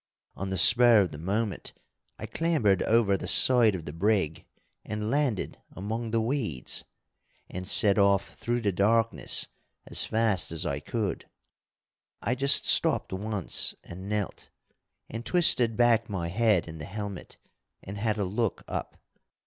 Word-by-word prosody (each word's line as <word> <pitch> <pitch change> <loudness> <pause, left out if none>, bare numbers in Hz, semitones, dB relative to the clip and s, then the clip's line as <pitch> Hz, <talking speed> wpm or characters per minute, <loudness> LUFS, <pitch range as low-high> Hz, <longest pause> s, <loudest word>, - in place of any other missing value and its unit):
On 95 +1 -5
the 95 - -3
spur 115 +4 +6
of 95 - -2
the 75 - -9
moment, 100 +2 -3 0.4
I - - -7
clambered 150 - 0
over 110 -3 +2
the - - -6
side 120 -5 +5
of 85 -3 -7
the 75 - -7
brig 95 -3 -1 0.4
and 105 +1 -4
landed 140 -8 -2
among 110 +4 -5
the 115 +1 0
weeds, 110 - -1 0.7
and 90 0 -7
set 100 0 +3
off 100 -1 +2
through 120 0 -3
the 105 -3 0
darkness 115 +4 +1 0.4
as - - +4
fast 110 -7 +1
as 80 - -2
I 70 0 -2
could. 110 - -4 0.9
I 115 - -2
just 140 +2 +3
stopped - - +2
once 105 -1 -2
and 95 +3 -10
knelt, 105 -2 -4 0.6
and 115 +1 -7
twisted 120 -8 +3
back 115 -2 +2
my 90 -4 -4
head 105 -2 +1
in 80 -1 -9
the 75 - -7
helmet 100 0 -8 0.5
and 100 +1 -8
had 110 0 -1
a 100 - -1
look 105 +2 -2
up. - - -6
105 Hz, 150 wpm, -27 LUFS, 95-115 Hz, 0.9 s, spur